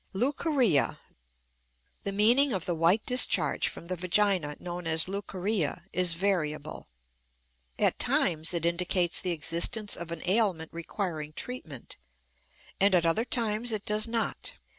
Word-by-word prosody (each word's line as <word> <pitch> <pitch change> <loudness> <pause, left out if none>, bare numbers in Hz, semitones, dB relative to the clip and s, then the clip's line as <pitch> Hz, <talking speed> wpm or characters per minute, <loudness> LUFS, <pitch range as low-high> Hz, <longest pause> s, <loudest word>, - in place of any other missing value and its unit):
LEUCORRHEA. 255 - +1 1.1
The 200 - -1
meaning 235 +7 +4
of 185 -3 -2
the 180 - -1
white 170 +6 +2
discharge 250 0 +3
from - - -7
the 185 +2 -3
vagina 180 -3 +1
known 175 -1 -6
as 160 +1 +1
leucorrhea 195 -3 -2
is 180 -2 +2
variable: 160 -5 -2 0.9
at - - +1
times 160 0 +2
it 170 -1 -1
indicates 175 0 +1
the 185 - -2
existence 170 +6 +1
of 170 -1 -7
an 170 - -6
ailment 185 -5 +1
requiring 165 -3 -5
treatment, 160 - -7 0.8
and 195 -1 +4
at 170 -2 +3
other 190 +8 +1
times 230 -1 0
it 215 -2 -3
does 215 +2 +2
not. 230 -1 -3
185 Hz, 135 wpm, -28 LUFS, 165-215 Hz, 1.1 s, meaning